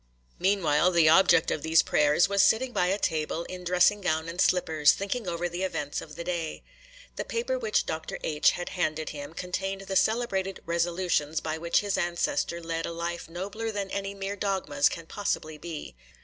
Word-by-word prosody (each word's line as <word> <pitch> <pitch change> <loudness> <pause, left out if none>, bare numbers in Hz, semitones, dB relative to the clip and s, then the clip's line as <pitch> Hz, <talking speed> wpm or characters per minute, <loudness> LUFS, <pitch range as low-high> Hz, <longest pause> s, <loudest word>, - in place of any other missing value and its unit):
Meanwhile, 180 -4 +3
the 165 -2 +5
object 170 -1 +5
of - - -1
these 160 +1 +4
prayers 150 +3 +3
was 200 0 +3
sitting 245 +3 +3
by 180 -4 +2
a 195 +2 +1
table 160 -3 -1
in 180 +1 -8
dressing 180 +3 +3
gown 160 -3 0
and 170 +3 -2
slippers, 160 -6 +4
thinking 200 +2 -3
over 175 0 -1
the 175 +1 -5
events 150 -6 -2
of 150 - -11
the 170 - -5
day. 170 -3 -3 0.5
The - - -2
paper - - -2
which 450 -2 +1
Dr. 160 0 -4
H. 150 -1 +3
had 175 - -5
handed 155 -4 -2
him 145 +1 -8
contained 195 +2 -3
the 195 0 -5
celebrated 195 -4 +1
'Resolutions' 170 -2 0
by 160 0 -4
which 170 +1 +2
his 205 -1 -1
ancestor 175 +4 -1
led 165 0 -3
a - - -4
life 170 0 -4
nobler 200 +6 -4
than 200 -2 -4
any 200 0 -3
mere 195 +1 -4
dogmas 190 -8 +1
can 170 - -7
possibly 155 -5 -3
be. 160 - -7
175 Hz, 185 wpm, -27 LUFS, 160-195 Hz, 0.5 s, the